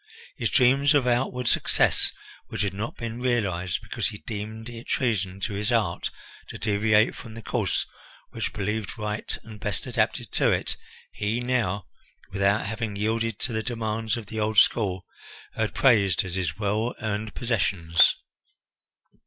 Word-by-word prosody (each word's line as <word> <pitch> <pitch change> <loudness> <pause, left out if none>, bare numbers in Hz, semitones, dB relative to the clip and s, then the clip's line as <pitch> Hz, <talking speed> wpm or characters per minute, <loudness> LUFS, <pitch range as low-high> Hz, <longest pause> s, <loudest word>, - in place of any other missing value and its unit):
His 115 - -1
dreams 135 +4 +4
of 140 -3 +4
outward 125 0 +1
success - - +3 0.4
which - - -2
had 100 -2 -1
not 105 +4 -4
been 115 +1 -5
realized, 100 -8 0
because 110 -2 -1
he 105 -1 -5
deemed 110 +1 -6
it 120 0 -9
treason 100 -7 0
to 105 - -2
his 105 +4 -1
art 105 -8 +1 0.4
to - - -7
deviate 105 +1 +3
from 115 -2 -10
the 115 - -8
course - - 0 0.5
which - - -2
he - - -8
believed 105 +2 -3
right 105 0 -3
and 110 -2 -11
best 105 -2 -2
adapted - - 0
to - - +3
it, - - 0 0.4
he 105 +3 -1
now, 120 -7 0 0.5
without 100 +2 +2
having 110 -1 -3
yielded 110 +1 0
to 120 - -2
the 110 - 0
demands 110 -1 -2
of 115 - -6
the 110 +2 -5
old 110 0 0
school, 95 -4 +4 0.5
heard 110 -1 -1
praised 100 - +4
as 90 - -5
his 90 -4 -2
well 110 +3 0
earned 110 0 -3
possessions. 90 -8 +3
110 Hz, 160 wpm, -26 LUFS, 100-115 Hz, 0.5 s, dreams